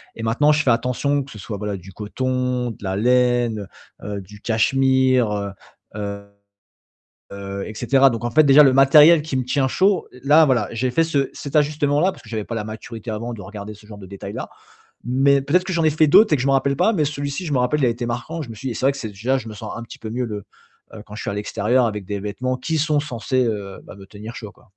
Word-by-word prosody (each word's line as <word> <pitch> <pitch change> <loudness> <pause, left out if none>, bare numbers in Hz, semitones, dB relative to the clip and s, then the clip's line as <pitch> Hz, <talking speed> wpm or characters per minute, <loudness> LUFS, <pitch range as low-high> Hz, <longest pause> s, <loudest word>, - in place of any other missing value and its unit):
et 115 - -7
maintenant, 135 +7 +3
je 150 - +2
fais 125 - +3
attention 125 +4 0
que 135 - -14
ce 105 - -10
soit, 105 +1 -6
voilà, 105 -1 -4
du 95 +1 -13
coton, 125 +3 -2
de 105 - -13
la 95 -1 -2
laine, 120 -2 +1 0.4
heu, 100 -1 -5
du 105 +2 -14
cachemire, 125 -3 +2 0.4
heu 100 -1 -5 1.1
heu, 100 0 -6
et 110 - -8
cetera. 135 +4 +4
Donc 115 0 -4
en 120 - -1
fait, 155 +5 +5
déjà 140 +1 +7
le 135 - +5
matériel 150 +4 +7
qui 150 -3 -4
me 130 - -1
tient 130 +1 0
chaud, 190 +5 +1 0.2
là, 155 +2 +6
voilà, 120 -6 +2
j'ai 125 +2 -1
fait 165 +5 +2
ce 140 -4 0
cet 140 +1 -5
ajustement-là 150 +3 +2
parce - - -15
que 110 - -16
j'avais 110 -2 -3
pas 115 - -5
la 105 - -3
maturité 110 +1 -8
avant 115 +2 -4
de 100 - -9
regarder 105 +2 -8
ce 105 +1 -18
genre 105 -1 -11
de 95 - -11
détails-là. 100 +1 -7 0.6
Mais 135 +3 +3
peut-être 175 +6 +2
que 190 - -4
j'en 170 -2 0
ai - - +5
fait 155 +1 +3
d'autres 210 +4 +6
et - - +3
que 125 - -3
je 135 - -1
me 135 - +3
rappelle 135 0 +1
pas. 220 - +3
Mais 160 -8 +1
celui-ci, 145 +4 -4
je 150 - -3
me - - +2
rappelle, 130 +4 +1
a - - +4
été 120 +1 -3
marquant. 120 +8 -4
Je 125 - -9
me 115 - -7
suis 130 +5 -6
dit: 115 - -4
«C'est - - -4
vrai 140 - +4
que 140 - -9
c'est 115 - -5
déjà 115 +7 -1
je 115 -2 -8
me 105 - -8
sens 105 +1 -7
un 115 - -6
petit 115 - -11
peu 110 - -7
mieux 125 +1 -2
le 105 -3 -6 0.6
quand 105 - -11
je - - -6
suis - - -3
à 100 - -4
l'extérieur 110 +4 +1
avec 105 -3 -4
des 100 -1 -4
vêtements 125 +6 -3
qui 160 +3 -2
sont 150 0 +1
censés 130 -2 -1
me 100 -2 -6
tenir 105 +4 -10
chaud, 105 -3 -8
quoi». 120 - -25
125 Hz, 250 wpm, -21 LUFS, 105-140 Hz, 1.1 s, déjà